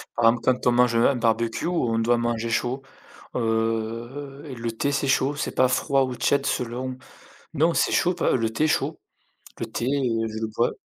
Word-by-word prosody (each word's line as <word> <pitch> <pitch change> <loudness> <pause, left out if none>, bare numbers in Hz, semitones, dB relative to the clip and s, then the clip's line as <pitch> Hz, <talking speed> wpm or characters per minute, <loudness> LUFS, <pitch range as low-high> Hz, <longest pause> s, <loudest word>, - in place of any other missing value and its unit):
Par 120 - +1
exemple, 115 0 0
quand 125 -1 +1
on - - +6
mange 120 -1 +3
un 120 +4 +4
barbecue, 115 -1 0
on 125 -10 0
doit 120 +1 +2
manger 120 -1 -1
chaud, 125 +3 -1 0.5
heu, 115 +5 -2
le 115 0 -3
thé, 140 +5 -1
c'est 140 0 0
chaud, 135 +1 +2
c'est 150 - -4
pas 130 - +4
froid 135 +1 +2
ou 130 -1 -3
tiède, 140 +3 +1
selon 125 0 -2 0.6
non 165 +3 +2
c'est - - +2
chaud 180 - +3
p 175 - -3
heu, - - +3
le 115 -2 0
thé 115 +7 0
est - - +4
chaud, 155 - 0 0.6
le - - -3
thé, 120 - -3
heu, 125 -4 0
je 110 0 -5
le 110 - -1
bois 120 - +2
120 Hz, 205 wpm, -24 LUFS, 115-135 Hz, 0.6 s, on